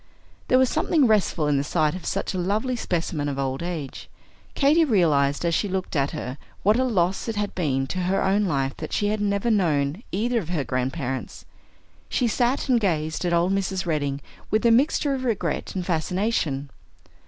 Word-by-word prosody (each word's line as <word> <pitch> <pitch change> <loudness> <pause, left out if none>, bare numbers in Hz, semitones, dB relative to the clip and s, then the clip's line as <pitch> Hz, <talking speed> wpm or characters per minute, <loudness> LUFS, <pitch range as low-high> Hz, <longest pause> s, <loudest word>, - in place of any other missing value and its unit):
There 255 - +4
was 260 0 +5
something 310 +1 +2
restful 205 -8 +2
in 145 -1 +2
the 140 - +1
sight 155 0 +1
of 185 - -7
such 195 - -2
a 185 - -2
lovely 215 +8 0
specimen 165 -8 -2
of 140 - -4
old 135 +1 -2
age. 165 -6 -5 0.5
Katy 295 +4 +4
realized, 155 - +2
as 170 - +1
she 205 +5 0
looked 185 -2 -3
at 140 -1 +2
her, 140 -3 -6 0.2
what 215 +5 +4
a - - +3
loss 190 -6 0
it 225 - -2
had 205 0 -2
been 135 -7 0
to 185 - -4
her 185 +2 +1
own 200 +2 +2
life 135 -6 -1
that - - -6
she 205 - +1
had 210 0 -1
never 200 +3 +1
known 160 -4 +1
either 235 +5 0
of 170 -6 -7
her 165 -5 -1
grandparents. 130 +1 -3 0.6
She 245 - +1
sat 245 +5 0
and 250 -3 +4
gazed 160 -5 -1
at 175 - +1
old 170 +2 +2
Mrs. 190 -1 -1
Redding 145 -4 -1 0.3
with 215 +3 +1
a 235 - +6
mixture 280 +3 +3
of 260 -1 -3
regret 230 -5 -2
and 180 -2 -2
fascination. 165 -5 -1
180 Hz, 195 wpm, -24 LUFS, 150-215 Hz, 0.6 s, a